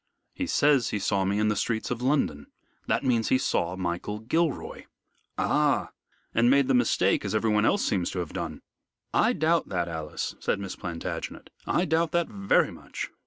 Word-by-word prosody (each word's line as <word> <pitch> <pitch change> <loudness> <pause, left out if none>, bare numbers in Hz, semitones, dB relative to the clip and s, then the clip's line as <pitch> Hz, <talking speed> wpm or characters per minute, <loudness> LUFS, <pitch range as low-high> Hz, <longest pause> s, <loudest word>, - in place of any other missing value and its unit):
He 275 - -3
says 145 - +3
he - - -1
saw 100 -1 0
me 100 +2 0
in 105 0 +2
the 105 - +1
streets 110 +2 -1
of 120 -1 -2
London. 125 - 0 0.4
That - - +1
means 120 -4 +1
he 130 - +4
saw 85 -7 0
Michael 90 +3 -3
Gilroy." 145 +7 -1 0.5
"Ah! - - +1 0.4
And 115 +1 +4
made 140 0 +4
the 135 - +2
mistake, 115 -6 +2
as 100 +1 -2
everyone 105 -1 +2
else 205 - +2
seems 90 -4 0
to 90 - -4
have 85 -3 -4
done." - - -5 0.5
"I - - +3
doubt 165 +2 +1
that, 90 -3 -1
Alice," 80 -2 -4
said - - -1
Miss 100 -2 -5
Plantagenet, 85 -3 -6 0.2
"I 180 - +2
doubt 165 0 +1
that 170 -1 +2
very 100 -1 +2
much. - - -7
110 Hz, 180 wpm, -27 LUFS, 95-135 Hz, 0.5 s, he